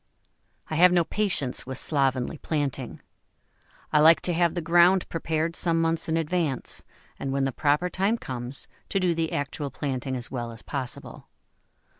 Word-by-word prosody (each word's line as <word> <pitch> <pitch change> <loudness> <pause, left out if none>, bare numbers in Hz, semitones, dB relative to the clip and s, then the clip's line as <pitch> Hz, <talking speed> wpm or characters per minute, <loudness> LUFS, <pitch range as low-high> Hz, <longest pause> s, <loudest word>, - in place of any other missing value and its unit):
I 155 - -3
have 180 +2 +7
no 175 -1 +4
patience 170 -12 0
with 130 -1 -4
slovenly 135 -1 0
planting. 140 -5 -3 0.9
I 150 - +5
like 160 +2 +7
to 175 - -1
have 170 0 +2
the - - 0
ground 175 +3 +4
prepared 165 0 -1
some 165 -2 +2
months 165 0 0
in 160 - +1
advance, 165 -4 -1 0.4
and 135 - -3
when 135 0 0
the 135 - 0
proper 150 +6 +1
time 195 +5 0
comes, 125 - -5 0.2
to 195 - +1
do 180 -2 +2
the 165 -1 -1
actual 145 0 -3
planting 130 -1 -3
as 120 -1 -5
well 120 -2 -4
as 115 - -12
possible. 130 -4 -5
155 Hz, 165 wpm, -26 LUFS, 135-170 Hz, 0.9 s, have